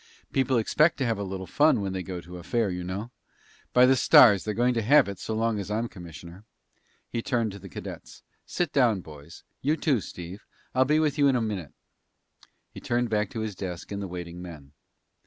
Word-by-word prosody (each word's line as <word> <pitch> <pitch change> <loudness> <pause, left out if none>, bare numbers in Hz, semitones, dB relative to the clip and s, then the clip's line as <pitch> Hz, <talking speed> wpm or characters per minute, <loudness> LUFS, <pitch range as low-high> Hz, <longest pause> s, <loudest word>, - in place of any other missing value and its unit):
People 130 -2 +2
expect 155 +8 +3
to 135 - -1
have 115 -3 -1
a - - -2
little 95 -1 -5
fun 150 +5 +3
when 100 -2 -3
they 95 - -3
go 90 -1 -6
to 90 +1 -10
a - - -11
fair, 115 0 0
you 90 0 -4
know. 100 +6 -5 0.6
By 125 0 +6
the 130 +1 +5
stars, 105 -5 +7
they're 105 -1 -3
going 125 +2 +2
to 115 - 0
have 140 +4 +5
it 100 -2 -6
so 110 - -4
long 115 -1 0
as 100 - -5
I'm 110 +3 -1
commissioner." 85 -1 -11 0.6
He 115 - -3
turned 115 -3 0
to 100 - -9
the 95 0 -11
cadets. - - -9 0.2
"Sit 175 -4 -2
down, 120 -8 +3
boys. 75 +1 -13 0.2
You 150 +4 +1
too, 135 -10 +1
Steve. 90 +3 -9 0.3
I'll 130 +1 +3
be 150 +3 +3
with 155 -1 +1
you 140 - +5
in 135 - +3
a - - +2
minute." 105 -9 -4 1.0
He - - -9
turned 120 -1 -1
back 105 -2 +1
to 110 - -5
his 110 -1 -3
desk 90 -1 -7
and 100 0 -4
the 100 - -4
waiting 90 -1 -7
men. 75 -6 -10
105 Hz, 220 wpm, -27 LUFS, 90-125 Hz, 1.0 s, stars